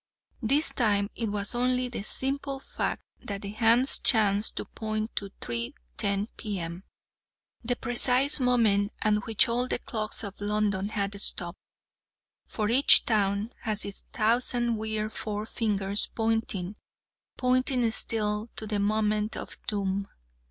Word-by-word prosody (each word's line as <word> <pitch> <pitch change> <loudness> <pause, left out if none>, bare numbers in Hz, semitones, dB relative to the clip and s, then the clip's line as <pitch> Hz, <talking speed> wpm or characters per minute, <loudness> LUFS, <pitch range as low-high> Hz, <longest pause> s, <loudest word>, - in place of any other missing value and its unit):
This 275 +7 +4
time 205 -4 0
it 225 -2 -4
was 205 -1 -2
only 250 +1 0
the 245 - -6
simple 270 +5 -1
fact - - -5 0.2
that 200 -1 -6
the 200 - -6
hands 230 +4 +3
chanced 210 -3 +2
to - - -1
point 215 0 -6
to 200 - -2
3.10 120 - -4
P.M., 180 -4 -6 0.8
the 245 +2 -1
precise 250 +4 +5
moment 225 -5 +1
at 215 - +2
which 225 +3 +3
all 245 +2 0
the - - -1
clocks 220 -1 -2
of 200 -1 -9
London 205 -1 -2
had 200 -1 -3
stopped 175 -2 +1 0.9
for 215 -2 -3
each 260 +5 +7
town 205 0 -1
has 215 -2 +5
its 200 - -5
thousand 235 +1 +2
weird 215 0 -4
fore 210 0 -5
fingers, 205 -3 +1
pointing, 220 -4 -3 0.6
pointing 255 -2 0
still, 215 -1 +1
to 220 - -4
the 210 -1 -3
moment 210 +1 -1
of - - -6
doom. 200 -1 -3
215 Hz, 135 wpm, -26 LUFS, 200-240 Hz, 0.9 s, each